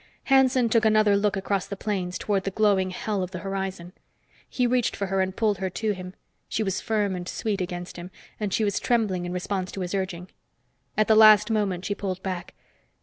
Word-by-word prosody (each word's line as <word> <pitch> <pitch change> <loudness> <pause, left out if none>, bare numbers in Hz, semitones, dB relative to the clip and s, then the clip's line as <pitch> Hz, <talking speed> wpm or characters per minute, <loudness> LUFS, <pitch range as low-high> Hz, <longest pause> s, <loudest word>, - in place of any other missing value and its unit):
Hanson 260 -2 +4
took 230 0 +2
another 215 -1 +4
look 200 0 +1
across 195 0 -1
the 200 - -6
plains 185 -3 -2
toward 200 -2 -1
the 195 - -1
glowing 195 -2 +2
hell 200 +2 -3
of 180 - -3
the 185 - -6
horizon. 190 -2 -4 0.6
He 250 - 0
reached 245 -1 +1
for 200 - -2
her 190 0 0
and 190 0 -2
pulled 210 -4 +1
her 190 -1 -1
to 215 +4 -1
him. 185 -1 -7 0.3
She 220 - -1
was 195 -2 -2
firm 210 -4 0
and 180 0 -5
sweet 205 -3 -2
against 175 -1 -5
him, 175 +1 -7 0.3
and 210 -2 -2
she 220 - +1
was 200 -2 0
trembling 210 -7 0
in - - -4
response 185 +1 -3
to 195 - -5
his 180 +1 -4
urging. 185 -2 -3 0.7
At 215 - +3
the 220 - +5
last 215 0 +7
moment 195 -4 0
she 205 - 0
pulled 190 -2 -4
back. 185 -2 -5
195 Hz, 210 wpm, -25 LUFS, 185-215 Hz, 0.7 s, last